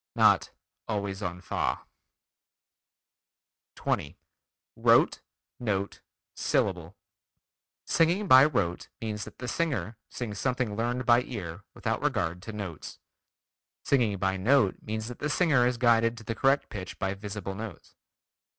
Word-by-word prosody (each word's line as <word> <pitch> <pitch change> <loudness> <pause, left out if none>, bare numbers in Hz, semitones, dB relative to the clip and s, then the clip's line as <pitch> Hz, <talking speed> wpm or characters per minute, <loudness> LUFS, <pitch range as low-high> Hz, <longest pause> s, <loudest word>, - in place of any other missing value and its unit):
Not - - +5 0.4
"always 100 -2 -3
on 90 -2 -4
fa." - - -1 1.9
20. 70 - -2 0.6
Rote, - - +4 0.4
Note, 100 -4 -2 0.3
Syllable: 90 -2 0 0.9
Singing 175 +5 +2
by 130 -2 +9
rote 100 - -1
means 105 -2 -4
that - - -12
the 125 - -6
singer 135 -7 -1
sings 105 -4 -5
something 125 -5 -1
learned 120 +2 -1
by 120 +1 +6
ear 100 -8 -6
without - - -2
regard 85 +1 -1
to 110 - -7
notes. 100 -7 -7 0.9
Singing 115 -7 +2
by 95 0 0
note 110 0 +3
means 110 +1 -4
that 125 - -8
the 150 - -1
singer 145 -5 +3
is 125 -1 -1
guided 115 -1 +3
to 110 - -10
the 115 - -3
correct 135 +4 +2
pitch 95 -3 -7
by 95 -1 -1
visible 100 -1 -6
notes. 105 -2 -8
110 Hz, 130 wpm, -28 LUFS, 95-125 Hz, 1.9 s, by